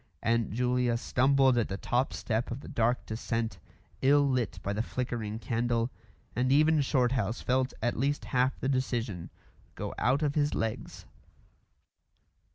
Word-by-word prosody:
Aunt 115 0 +1
Julia 125 +1 +1
stumbled 130 +1 +3
at 115 - 0
the 95 - -4
top 125 +6 0
step 115 0 -2
of 120 +3 -5
the - - -11
dark 120 +2 0
descent, 110 -2 -3 0.4
ill 145 +1 +5
lit 125 -7 0
by 100 - -1
the 105 - 0
flickering 115 -3 -3
candle, 115 +1 -1 0.4
and 125 +3 +1
even 155 +2 +5
Shorthouse 125 -4 +1
felt 130 +1 +1
at 120 - +1
least 140 +2 -1
half 130 +1 +2
the - - -2
decision 120 -9 -1 0.5
go - - -4
out 135 +6 +2
of 145 -1 +1
his 145 -1 +1
legs. 110 -1 -4
125 Hz, 150 wpm, -30 LUFS, 115-130 Hz, 0.5 s, ill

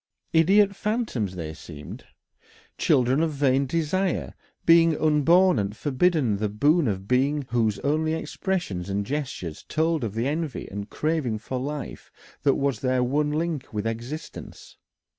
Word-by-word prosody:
Idiot 195 +5 +4
phantoms, 210 - -2
they 80 -3 -5
seemed, 75 -2 -10 0.7
children 130 +3 +3
of 160 -2 0
vain 135 -1 +2
desire, 170 +5 -1 0.3
beings 165 -1 +5
unborn 165 +3 +4
and 100 +1 -3
forbidden 145 - +1
the 105 +1 -1
boon 145 - +3
of 95 -2 -3
being, 140 +4 +2
whose 115 -3 +1
only 155 +2 +1
expressions 160 - -3
and 100 +1 -1
gestures 125 - -4
told 160 -2 +1
of 110 -2 -3
the 115 +3 0
envy 155 -1 -3
and 100 +1 -6
craving 150 -8 -1
for 125 +4 -4
life 145 +1 -6 0.3
that 140 - +3
was 140 -5 0
their 130 0 +1
one 145 +4 +1
link 155 -2 -2
with 105 0 -3
existence. 120 +8 -6
140 Hz, 140 wpm, -25 LUFS, 110-160 Hz, 0.7 s, beings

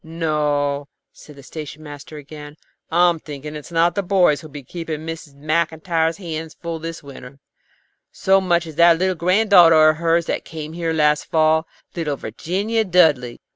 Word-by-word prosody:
"No," 150 -3 -1 0.3
said 150 - -15
the 140 - -14
station 155 +1 -9
master 145 +1 -10
again, 150 0 -11 0.3
"I'm 175 0 +3
thinking 150 0 -8
it's 150 +3 -9
not 170 +1 +2
the 200 - -1
boys 180 -6 +2
who 160 - -10
will 145 - -20
be 145 -2 -8
keeping 160 +2 -6
Mrs. 160 -3 -8
Maclntyre's 160 +2 -1
hands 160 -4 -6
full 170 -1 -6
this 165 0 -7
winter, 140 -1 -12 0.7
so 195 0 +2
much 175 -2 +1
as 160 -2 -10
that 170 -1 +6
little 185 +2 +1
granddaughter 175 -4 +5
of 155 - -8
hers 165 0 +1
that - - -3
came 155 -1 -8
here 165 -1 -2
last 150 -2 +1
fall, 160 0 +2 0.3
little 155 -5 -2
Virginia 195 - -2
Dudley. 155 - +2
160 Hz, 170 wpm, -20 LUFS, 150-170 Hz, 0.7 s, that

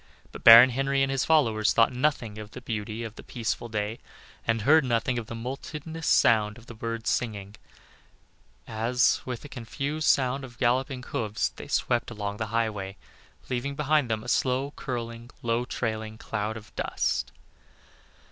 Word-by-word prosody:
But - - -10
Baron 115 +3 +10
Henry 135 +2 +1
and 135 - 0
his 135 -1 0
followers 110 -10 +3
thought 115 +2 +4
nothing 125 -5 -1
of 105 -1 -8
the 125 - -10
beauty 110 -1 -4
of 110 -2 -6
the - - -11
peaceful 120 0 -3
day, 105 +1 -3 0.5
and 115 -1 +1
heard 155 +5 +6
nothing 120 0 0
of 110 - -8
the 115 - -6
multitudinous 150 +6 -6
sound 105 -1 +4
of 120 - -15
the 115 -1 -5
singing 105 -5 -2
birds - - -17 1.1
as, 115 +3 +1
with 125 0 -5
a - - -6
confused 140 +4 -4
sound 135 +1 +2
of 120 -3 -10
galloping 130 +1 0
hoofs, 110 -3 -2
they - - -11
swept 120 -1 0
along 105 -3 -4
the 110 - -3
highway, 105 -3 -2 0.5
leaving 130 +3 -2
behind 150 -2 +2
them 110 -1 -1
a - - -10
slow 130 +3 +1
curling, 115 -2 -5
low 120 +1 0
trailing 110 -3 -3
cloud 110 0 -3
of 110 -1 -14
dust. - - -1
120 Hz, 165 wpm, -27 LUFS, 110-130 Hz, 1.1 s, Baron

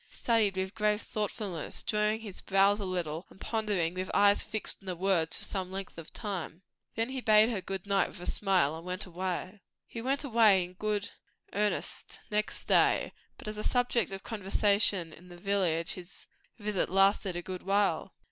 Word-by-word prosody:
Studied 220 -5 +1
with 190 0 -2
grave 210 -1 +1
thoughtfulness, 205 -5 -3
drawing 210 +1 +1
his 205 -4 -8
brows 195 +1 +3
a 200 - -3
little, 175 -2 -3
and - - -18
pondering 205 -8 0
with 185 +1 -4
eyes 200 0 +5
fixed 220 -1 -3
on 195 - -17
the 180 - -2
words 175 -3 +3
for - - -5
some 185 -2 -3
length 195 0 -6
of 160 - -10
time. 190 -4 -5 0.3
Then 225 +2 0
he 260 -1 -4
bade 215 0 +5
her 215 -5 -2
good 195 -1 -5
night 200 -1 +2
with - - -11
a 175 - -7
smile, 185 -7 +2
and 165 - -9
went 180 +2 -1
away. 185 +2 -4 0.2
He 230 - -7
went 270 +4 0
away 220 -8 +5
in 175 +1 -9
good 210 +1 -2 0.4
earnest 210 0 -1
next 210 0 -1
day; - - +3 0.2
but - - -10
as 215 0 -4
a - - -3
subject 245 -5 +1
of 195 0 -7
conversation 200 -4 +1
in 180 - -15
the 175 -1 -12
village 175 -4 +1
his 180 0 -8 0.3
visit 210 -3 -1
lasted 195 0 +3
a 175 - -4
good 185 0 -6
while. 200 +1 +1
195 Hz, 185 wpm, -30 LUFS, 180-210 Hz, 0.4 s, eyes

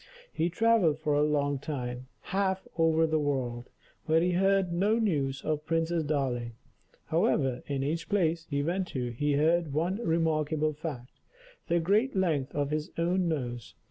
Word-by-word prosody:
He 165 +2 0
travelled 195 -5 +3
for 155 -1 -1
a 145 - +3
long 145 -2 +1
time, 125 -3 -5
half 190 0 -1
over 165 -1 +3
the 155 -1 +1
world, 130 -4 -2 0.4
but 160 +1 +4
he 180 - +2
heard 195 0 +2
no 205 +6 +2
news 145 -12 0
of 155 0 -2
Princess 165 0 0
Darling. 130 -6 -1 0.5
However, 150 - +1
in 140 -2 -2
each 160 +4 -2
place 170 -5 +1
he 140 -1 0
went 180 +4 -1
to, 125 -6 -3
he 145 +5 0
heard 160 +1 +2
one 170 +6 0
remarkable 155 -5 0
fact 145 -5 -7 0.5
the 170 0 +2
great 205 +10 +2
length 155 -8 0
of 145 0 -1
his 155 +3 -2
own 175 +2 +1
nose. 120 -7 -4
155 Hz, 160 wpm, -29 LUFS, 140-175 Hz, 0.5 s, but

